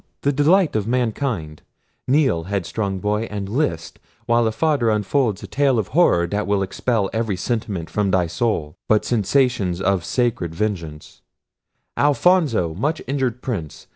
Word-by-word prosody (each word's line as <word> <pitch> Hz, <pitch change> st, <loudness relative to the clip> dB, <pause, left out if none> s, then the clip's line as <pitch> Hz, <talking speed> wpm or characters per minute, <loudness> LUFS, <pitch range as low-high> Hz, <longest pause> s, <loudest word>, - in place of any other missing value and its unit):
the 140 Hz, -, +2 dB
delight 155 Hz, -, +3 dB
of 105 Hz, -1 st, 0 dB
mankind! 115 Hz, -, -2 dB, 0.5 s
Kneel, 130 Hz, -, +2 dB
headstrong 100 Hz, +1 st, -2 dB
boy, 105 Hz, +3 st, -1 dB
and 100 Hz, -1 st, -4 dB
list, 100 Hz, -, -2 dB, 0.3 s
while 120 Hz, 0 st, +3 dB
a -, -, 0 dB
father 140 Hz, -2 st, +1 dB
unfolds 105 Hz, +1 st, 0 dB
a -, -, -6 dB
tale 135 Hz, -3 st, +2 dB
of 110 Hz, -, -1 dB
horror 135 Hz, -, +3 dB
that 105 Hz, +4 st, -2 dB
will 100 Hz, -1 st, +1 dB
expel 105 Hz, +2 st, -1 dB
every 110 Hz, -3 st, -1 dB
sentiment 100 Hz, -5 st, -3 dB
from 105 Hz, -2 st, -1 dB
thy 95 Hz, -2 st, +2 dB
soul, 85 Hz, -5 st, -2 dB
but 110 Hz, -1 st, +2 dB
sensations 105 Hz, -5 st, +1 dB
of 95 Hz, -2 st, +1 dB
sacred 110 Hz, -7 st, -1 dB
vengeance—Alfonso! 110 Hz, -, -1 dB
much 150 Hz, -, -2 dB
injured 130 Hz, -3 st, -2 dB
prince! 90 Hz, -, -5 dB
110 Hz, 140 wpm, -21 LUFS, 95-130 Hz, 0.5 s, delight